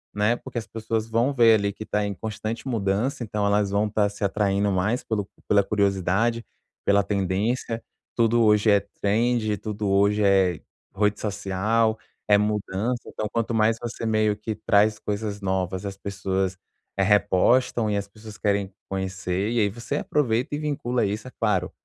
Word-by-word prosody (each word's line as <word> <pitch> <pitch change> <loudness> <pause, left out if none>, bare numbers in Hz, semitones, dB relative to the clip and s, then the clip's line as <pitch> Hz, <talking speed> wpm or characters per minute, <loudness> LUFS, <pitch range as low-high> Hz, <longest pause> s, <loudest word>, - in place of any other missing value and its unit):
né, 105 +3 +2
porque - - -9
as 110 - -3
pessoas 110 0 -3
vão 115 +5 +1
ver 115 -4 +6
ali 100 0 0
que 110 +2 -9
tá 105 0 0
em 100 - -2
constante 110 +4 -5
mudança, 115 +4 -1
então 105 -1 -2
elas 100 0 +2
vão 100 +2 +1
estar 105 -1 +1
se 105 0 -8
atraindo 100 0 +1
mais 100 +6 0
pelo 105 -3 -2 0.2
pela 100 -1 +5
curiosidade, 100 +3 +1 0.4
pela 100 0 +3
tendência, 105 +4 -1 0.3
tudo 115 0 +3
hoje 105 0 +4
é 100 - +5 0.2
trend, 110 0 +1
tudo 105 +1 -4
hoje 100 +2 +3
é, 95 -4 +3 0.4
rede 105 +1 +1
social, 110 +2 0 0.3
é 105 - +6
mudança, 105 +3 -1
então 105 - -4
quanto 115 0 -1
mais 110 0 +3
você, 115 -1 -4
meio 110 -1 +2
que 105 +1 -5
traz 105 +1 +3
coisas 105 -1 -4
novas, 95 -1 -2
as 100 -1 -4
pessoas 95 -1 -2 0.4
repostam 105 +4 +3
e 105 - 0
as 100 0 -3
pessoas 105 0 -12
querem 100 -2 0 0.2
conhecer 95 +1 -2
e 120 - +1
aí 100 - +2
você 120 +7 -4
aproveita 125 -2 0
e - - -2
vincula 140 -6 -1
isso. 105 +6 -3
É - - -18
claro, 95 -4 +1
105 Hz, 170 wpm, -25 LUFS, 100-115 Hz, 0.4 s, ver